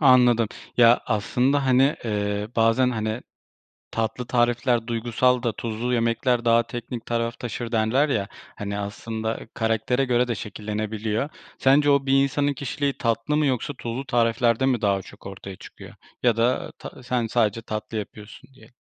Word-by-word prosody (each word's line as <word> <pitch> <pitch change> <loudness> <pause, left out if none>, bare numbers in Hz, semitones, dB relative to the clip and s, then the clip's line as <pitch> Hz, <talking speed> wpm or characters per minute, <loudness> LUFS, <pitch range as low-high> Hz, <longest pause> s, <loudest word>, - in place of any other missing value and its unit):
Anladım. 125 -5 +5 0.3
Ya, 120 0 +6
aslında, 125 +6 +1
hani, 130 +3 +4
eee, 105 -1 -1
bazen, 115 +3 +3
hani, 110 0 -2 0.7
tatlı 115 +2 -2
tarifler 120 -1 +1
duygusal 120 +2 +1
da 120 - 0
tuzlu 115 +3 -3
yemekler 120 +1 +1
daha 115 0 +5
teknik 120 0 -7
taraf 115 0 -2
taşır 120 0 -5
derler 115 +7 +2
ya, 100 -7 -1 0.3
hani, 100 0 -4
aslında 110 +2 -4
karaktere 115 +3 +1
göre 125 -1 +2
de 120 - 0
şekillenebiliyor. 110 +4 -3 0.3
Sence 145 +2 +4
o, 140 -1 +3
bir 135 0 +4
insanın 145 +1 +1
kişiliği 140 +1 -3
tatlı 115 +5 0
mı 150 -1 +2
yoksa 130 +2 -1
tuzlu 120 +4 -4
tariflerde 120 +1 +2
mi 125 -4 +2
daha 100 -2 +1
çok 95 - -15
ortaya 95 -1 -8
çıkıyor - - -12 0.3
ya 120 -2 +3
da, 120 +2 0
ta - - -10
sen, 125 -1 -1
sadece 115 -1 +1
tatlı 110 0 -5
yapıyorsun 105 +3 -8
diye 135 - -18
115 Hz, 155 wpm, -24 LUFS, 110-125 Hz, 0.7 s, Ya